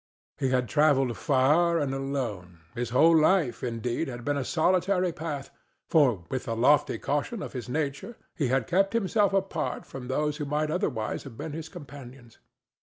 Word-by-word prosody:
He 130 - +1
had 125 -1 +1
travelled 135 -2 +3
far 155 +5 +3
and 145 -4 -1
alone; 120 -11 -4
his 120 0 -3
whole 160 +7 +5
life, 155 -4 +3
indeed, 120 +4 -2
had 120 -2 -7
been 145 - 0
a 140 - -1
solitary 180 +4 +1
path, 155 -4 -5 0.4
for, 125 - +3
with 130 +5 -4
the 115 - -2
lofty 145 +4 +3
caution 150 +10 -2
of - - -7
his 125 -3 -6
nature, 150 - -3 0.2
he 145 - -1
had 130 +2 +1
kept 195 +3 +2
himself 210 -2 +2
apart 195 0 -2
from 130 -2 -8
those 150 +3 -1
who 150 - -3
might 150 +2 -1
otherwise 135 - -2
have 130 -5 -11
been 150 +1 -5
his 160 0 -6
companions. 135 -7 -12
145 Hz, 175 wpm, -27 LUFS, 125-165 Hz, 0.4 s, whole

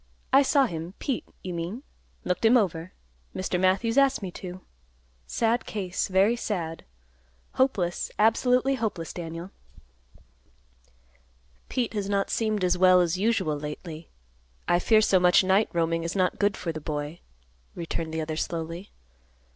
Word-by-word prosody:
"I 270 - +8
saw 275 0 +4
him; 170 -2 -6
Pete, 270 -5 -3 0.2
you 185 - -4
mean. 175 +10 -5 0.4
Looked 180 +4 -2
him 230 +3 +6
over. 180 -5 -1 0.4
Mr. 185 -1 -1
Matthews 200 +7 +3
asked 275 -5 +2
me 185 - -4
to. 185 +1 -8 0.7
Sad 230 +1 0
case, 190 -4 -2
very 195 +5 +3
sad. 170 -8 -4 0.7
Hopeless, 195 -10 0
absolutely 250 +5 +3
hopeless, 215 - -3
Daniel." 170 +2 -6 2.2
"Pete 245 -3 -1
has 200 -2 -2
not 200 -1 0
seemed 215 -3 0
as 180 0 +2
well 185 0 +6
as 175 0 +1
usual 195 -9 +1
lately. 155 +2 -7 0.6
I 175 +1 +3
fear 215 +4 +4
so 195 -3 +4
much 180 +1 +5
night 190 +3 +3
roaming 165 -1 0
is 165 +3 -3
not 185 -2 +1
good 205 -1 +2
for 170 - -3
the 155 -1 -7
boy," 150 +2 -4 0.6
returned 165 -1 -4
the 160 0 -2
other 155 0 -4
slowly. 165 +3 -4
185 Hz, 145 wpm, -26 LUFS, 165-220 Hz, 2.2 s, I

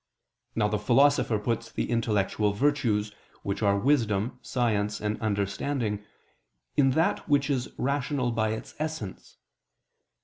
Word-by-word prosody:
Now 105 -2 +2
the 105 0 -1
Philosopher 125 +1 +4
puts 115 +2 -2
the - - -2
intellectual 105 -2 +1
virtues, 110 -5 +1 0.3
which 100 +2 -2
are 100 -1 +3
wisdom, 115 -2 +1
science 105 -4 0
and 105 0 -2
understanding, 105 +2 -1 0.7
in 135 -2 +4
that 165 0 +1
which 145 0 +3
is 125 -3 -1
rational 140 -2 0
by 110 -1 +1
its 110 +1 -5
essence. 155 -11 -5
115 Hz, 125 wpm, -27 LUFS, 105-135 Hz, 0.7 s, Philosopher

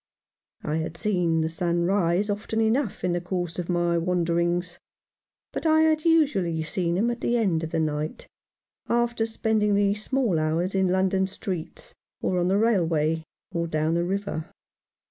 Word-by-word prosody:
I 150 +1 -1
had 160 +1 -4
seen 175 -6 +1
the 160 - 0
sun 170 +1 0
rise 185 +1 +2
often 210 +2 -2
enough 225 +1 0
in 180 - +1
the 175 0 -1
course 175 -1 -3
of 175 - -4
my 175 -1 +1
wanderings; 175 0 0 0.7
but - - -2
I 315 0 +5
had 315 0 +2
usually 200 - +2
seen 170 +1 -1
him 230 +5 +2
at 240 - -6
the 240 - +1
end 180 -8 +1
of 160 - -3
the 165 0 -1
night 155 0 -2 0.4
— - - -68 0.2
after 235 -1 +1
spending 220 -2 +1
the 200 0 +3
small 215 -3 0
hours 160 +4 0
in 190 -1 +2
London 190 +1 +2
streets, 185 -3 -6 0.3
or 180 - 0
on 175 - +1
the 190 +2 +2
railway, 165 -8 +2 0.3
or 170 -2 -1
down 155 0 0
the 170 0 +1
river. 190 -3 -3
180 Hz, 170 wpm, -25 LUFS, 170-210 Hz, 0.7 s, I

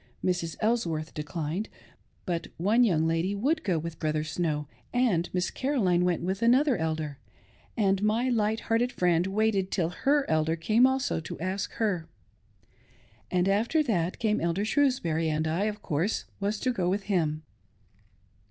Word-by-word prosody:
Mrs. 175 -3 -1
Elsworth 170 -9 0
declined; 155 +5 -4 0.6
but 170 -3 -2
one 210 +8 +3
young 165 -8 +2
lady 165 +5 0
would 295 +10 0
go 180 -4 +1
with 160 0 -5
Brother 155 0 0
Snow, 155 -2 -2 0.2
and 220 -9 +1
Miss 180 -1 -1
Caroline 205 -11 +1
went 180 -2 0
with 190 +3 -2
another 255 +4 +4
Elder; 155 -4 -3 0.6
and 195 -3 +2
my 220 +4 +1
light 220 -2 +1
hearted 230 +2 +1
friend 175 -2 +2
waited 200 -1 +1
till 175 -4 0
Aey 280 +10 +2
Elder 160 +1 +1
came 220 +9 +4
also 265 -7 0
to 160 - -7
ask 185 +3 -3
&er. 185 -8 0 1.2
After 200 - +2
that, 180 - 0
came 215 -3 0
Elder 170 +5 0
Shrews 270 +2 +2
bury, 160 -1 -1
and 155 +1 0
I, 170 +6 0
of 210 -1 -4
course, 170 +6 -1
was 205 +1 -1
to 255 - +1
go 180 -6 0
with 195 +2 -1
him. 160 -6 0
185 Hz, 155 wpm, -28 LUFS, 165-220 Hz, 1.2 s, another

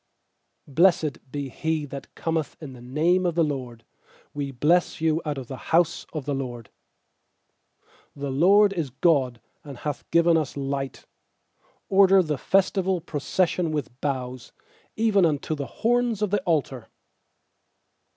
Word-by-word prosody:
26Blessed 155 -1 +3
be 140 -1 -4
he 160 +3 -2
that 140 -1 -9
cometh 160 -2 -2
in 150 -4 -9
the 125 - -12
name 160 +9 +1
of 175 -2 0
the 170 - +3
LORD; 130 -6 -4 0.5
We 145 -1 -3
bless 150 +7 +1
you 160 0 +1
out 150 -2 -2
of 130 - -5
the 130 - -7
house 165 0 +2
of 150 -4 -5
the 145 - -1
LORD. 120 -5 -5 1.5
27The 140 -1 -3
LORD 200 +4 +6
is 165 -7 -2
God, 130 -3 +1 0.2
and 140 -4 -9
hath 145 +2 -5
given 170 0 +4
us 150 -3 -3
light; 135 -1 -4 0.8
Order 195 -1 +5
the 150 -4 -2
festival 190 -1 +1
procession 170 +2 -1
with 140 -4 -4
boughs, 130 -3 -4 0.4
even 215 -3 +3
unto 155 -1 0
the 145 -3 -4
horns 235 -2 0
of 205 - -1
the 205 -2 +1
altar. 140 - -1
155 Hz, 140 wpm, -25 LUFS, 135-175 Hz, 1.5 s, LORD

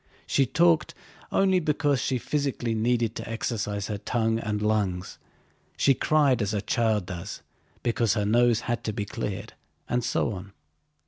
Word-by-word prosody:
She 135 - +2
talked 165 +1 +3 0.4
only 190 -1 +3
because 145 -4 +1
she 130 - 0
physically 135 -3 -1
needed 115 0 +1
to - - -6
exercise 105 -3 -2
her 105 -2 -4
tongue 115 0 0
and 105 -2 -2
lungs. 105 -4 -1 0.6
She 135 - +5
cried 140 -3 +3
as 105 +1 -1
a 100 - 0
child 110 -4 +1
does, 85 -2 -7 0.4
because 115 -2 +1
her 105 -2 0
nose 120 +1 +3
had 120 -1 -2
to 110 - -1
be 105 -1 -3
cleared, 105 -4 -5 0.3
and 125 0 0
so 115 - 0
on. 100 +1 -9
115 Hz, 155 wpm, -26 LUFS, 105-130 Hz, 0.6 s, She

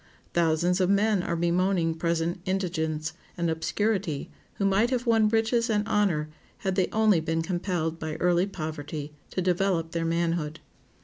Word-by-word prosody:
Thousands 170 +2 +2
of 185 - +2
men 200 0 +3
are 170 - -2
bemoaning 175 0 +1
present 170 +1 -1
indigence 160 -5 -1 0.2
and 170 -1 0
obscurity 165 -1 -1 0.2
who 200 - -1
might 195 +4 +3
have 250 -1 -1
won 225 -2 +4
riches 230 +2 +2
and 210 -1 +1
honor 185 -9 +1 0.4
had 190 - +1
they 185 -1 +2
only 215 -5 +4
been 160 +1 -1
compelled 175 -2 -2
by 155 -1 -4
early 175 +1 +2
poverty 155 -4 -5 0.2
to 185 - -2
develop 180 -2 +1
their 165 0 -1
manhood. 165 -2 -1
175 Hz, 150 wpm, -27 LUFS, 165-195 Hz, 0.4 s, won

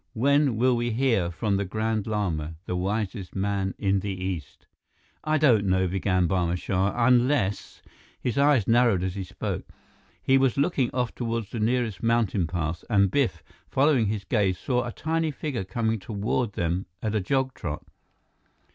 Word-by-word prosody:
"When 140 +2 +3
will 125 +2 +3
we 120 0 -1
hear 115 -7 +1
from 100 +3 -1
the 100 - 0
Grand 110 +2 -2
Lama, 85 -8 -2
the 90 - -3
wisest 100 +1 -3
man 95 -1 -1
in 100 -1 +1
the 100 - -4
East?" 95 -5 -5 0.6
"I 155 0 +2
don't 120 -9 +4
know," 95 0 +2
began 90 -1 +1
Barma 90 -1 0
Shah, 95 +2 0
"unless 125 -5 +1 0.2
" - - -27
His 120 -3 -2
eyes 140 -6 +3
narrowed 115 -5 +4
as 95 -1 -2
he 100 0 -4
spoke. 90 - -5 0.5
He 135 0 +3
was 135 -2 +2
looking 140 -4 +1
off 125 -2 -2
toward 115 -2 -2
the 115 - -4
nearest 115 -2 0
mountain 115 -6 +1
pass, 85 0 -3
and 100 -4 +3
Biff, 115 - 0 0.3
following 135 -5 +3
his 105 -1 -2
gaze, 95 -3 +1
saw 125 +4 -1
a - - -4
tiny 160 +4 -1
figure 140 -7 -3
coming 110 +4 -1
toward 105 +2 -2
them 90 +3 -1 0.2
at 110 -1 -1
a 110 - +1
jog 130 +5 0
trot. 75 -3 -5
105 Hz, 170 wpm, -26 LUFS, 95-125 Hz, 0.6 s, don't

